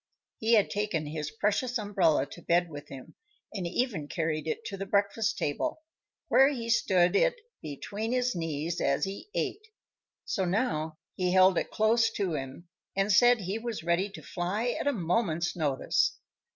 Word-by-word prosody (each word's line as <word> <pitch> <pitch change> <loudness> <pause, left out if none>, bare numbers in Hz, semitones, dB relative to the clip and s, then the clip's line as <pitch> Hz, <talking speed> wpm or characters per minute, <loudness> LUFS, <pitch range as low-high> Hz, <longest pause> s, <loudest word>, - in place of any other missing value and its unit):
He 225 +1 +2
had 210 - +3
taken 200 -7 -1
his 150 0 -4
precious 210 +10 0
umbrella 190 -10 +2
to 175 - -10
bed 175 0 +1
with 145 -1 -8
him 135 -2 -10 0.4
and 190 -4 -3
even 190 - -1
carried 160 -1 -2
it 455 0 -3
to - - -4
the 195 0 -5
breakfast 200 +2 +1
table, 310 - -2 0.4
where 270 - +6
he 235 -5 -3
stood 180 -6 +3
it - - +3 0.3
between 205 - -5
his 250 -1 +1
knees 165 0 -3
as 140 +1 +1
he 195 - -7
ate; 430 +3 -2 0.6
so 195 - -1
now 175 -6 -1 0.2
he 180 -1 0
held 185 0 +6
it - - -4
close 225 +1 +3
to 190 -5 -1
him 135 +4 -6 0.3
and 195 +2 +1
said 240 +3 +6
he 195 +4 -3
was 225 -7 -5
ready 170 +4 +1
to 195 - -11
fly 200 +7 -2
at 245 - -2
a - - +4
moment's 175 - 0
notice. 145 -6 +1
195 Hz, 170 wpm, -29 LUFS, 165-225 Hz, 0.6 s, where